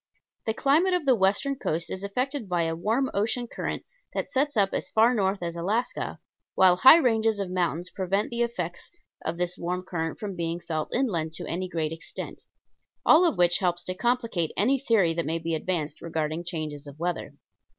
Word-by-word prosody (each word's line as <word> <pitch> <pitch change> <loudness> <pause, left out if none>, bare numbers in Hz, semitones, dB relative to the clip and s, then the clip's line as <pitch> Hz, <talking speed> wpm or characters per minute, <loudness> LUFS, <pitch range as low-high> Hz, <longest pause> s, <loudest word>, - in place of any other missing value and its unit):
The 220 - +1
climate 325 +9 +3
of 350 -4 -1
the 265 - +5
western 205 +6 +2
coast 165 -7 -2
is 190 - -4
affected 250 +3 -2
by 175 -1 +1
a 165 0 -1
warm 225 +10 0
ocean 225 +4 0
current - - -5 0.3
that - - -2
sets 280 -1 +1
up 195 -2 +3
as - - -2
far 225 +3 +4
north 195 -4 0
as 170 0 -3
Alaska, 205 +8 -2 0.4
while 185 -1 +6
high 260 - +9
ranges 225 -7 +2
of 195 -2 -3
mountains 175 -1 -1
prevent 195 +4 -1
the 235 0 -2
effects 180 -8 -3 0.3
of 165 +1 -3
this 180 +1 -1
warm 180 +1 -2
current 165 -3 -3
from 200 -3 -5
being 170 0 -2
felt 160 -3 -3
inland 170 -12 0
to - - -6
any 185 +2 -3
great 160 -3 -2
extent; 165 +1 -7 0.6
all 325 +4 +7
of 335 - +1
which 175 0 +4
helps 175 -2 0
to 185 - -2
complicate 230 -6 0
any 260 +8 +3
theory 220 -10 +3
that 170 0 -1
may 165 +1 0
be 165 0 -3
advanced 160 -1 -2
regarding 160 0 -2
changes 155 -4 -4
of 140 0 -11
weather. 175 +1 -3
185 Hz, 190 wpm, -26 LUFS, 170-230 Hz, 0.6 s, high